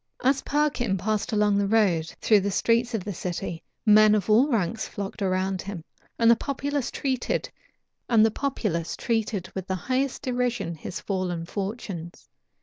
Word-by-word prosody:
As 270 +2 +3
Perkin 275 -9 0
passed 215 +2 -1
along 210 -1 +3
the 200 - +1
road 190 -7 +2
and - - -15
through 215 -2 +5
the 200 +1 -1
streets 235 +4 +1
of 205 - -2
the 205 - -4
city, 170 -2 -4 0.2
men 215 0 +7
of 210 0 0
all 235 +6 +6
ranks 220 - -1
flocked 200 +1 -6
about 190 0 0
him, 195 -4 -7 0.3
and 230 0 +5
the - - +7
populace 280 +1 -2
treated 260 -3 -1 0.6
with 215 - 0
the 190 - -1
highest 260 +2 -1
derision 245 -8 -1
his 165 +3 -6
fallen 180 -4 -2
fortunes. 190 -3 -6
210 Hz, 145 wpm, -26 LUFS, 190-240 Hz, 0.6 s, men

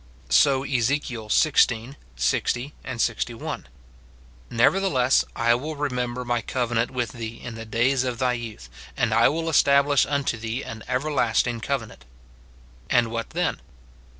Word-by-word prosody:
So 135 - +4
Ezek. 135 +1 +1
xvi. 120 +1 +2 0.2
60, 120 - 0 0.3
61, 115 0 -2 0.8
"Nevertheless 130 0 +3
I 115 0 +3
will 150 +6 -3
rememher 125 -3 -2
my 120 -1 0
covenant 120 0 -1
with 125 -4 -2
thee 115 -1 -7
in 120 - -7
the 115 0 -8
days 125 +4 +1
of 125 -2 -2
thy 125 0 +1
youth, 115 - -7 0.3
and 115 -2 +1
I 115 +1 +5
will 165 +2 -2
establish 140 -2 +4
unto 140 -4 -1
thee 115 +3 -4
an 110 0 -8
everlasting 125 -3 0
cove 135 -1 -1
nant." 65 - -16 0.8
And 120 -2 +3
what 115 0 -3
then? 175 +2 -1
125 Hz, 135 wpm, -24 LUFS, 115-140 Hz, 0.8 s, I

